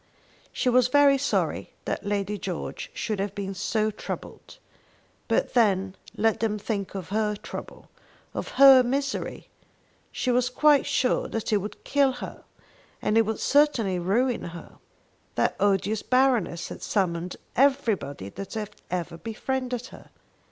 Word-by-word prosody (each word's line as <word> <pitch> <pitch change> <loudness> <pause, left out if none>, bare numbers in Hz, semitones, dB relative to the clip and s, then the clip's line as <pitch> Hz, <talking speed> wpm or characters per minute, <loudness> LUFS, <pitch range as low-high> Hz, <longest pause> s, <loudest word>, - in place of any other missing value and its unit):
She - - -2
was 250 0 +5
very 280 +1 +5
sorry 280 - -1
that - - -3
Lady 205 0 -1
George 180 -3 -5
should 215 -3 -3
have 200 0 -2
been 195 -1 -4
so 215 +3 0
troubled; 215 - -8 0.7
but - - 0
then 195 -5 +2 0.2
let 225 0 +2
them 220 -2 0
think 200 -2 -4
of 190 -3 -5
her 210 +1 0
trouble, - - -9 0.5
of - - -4
her 270 -1 +9
misery! 270 +2 -2 0.6
She 255 - -1
was 250 0 +2
quite 290 +2 +4
sure 255 - +1
that 225 -1 -3
it - - +5
would 205 +2 -6
kill 280 -2 +2
her, - - -8 0.6
and 210 - 0
it 225 -1 +4
would 220 - -2
certainly 245 -11 +3
ruin 235 +8 +1
her. 170 0 -9 0.6
That - - +1
odious 205 +1 +1
Baroness 250 -10 +1
had - - -8
summoned 180 -3 -1 0.2
everybody 225 - +1
that 195 - -8
had 210 -2 -4 0.2
ever 175 -2 -3
befriended 250 +4 -3
her. - - -13
220 Hz, 145 wpm, -26 LUFS, 195-255 Hz, 0.7 s, her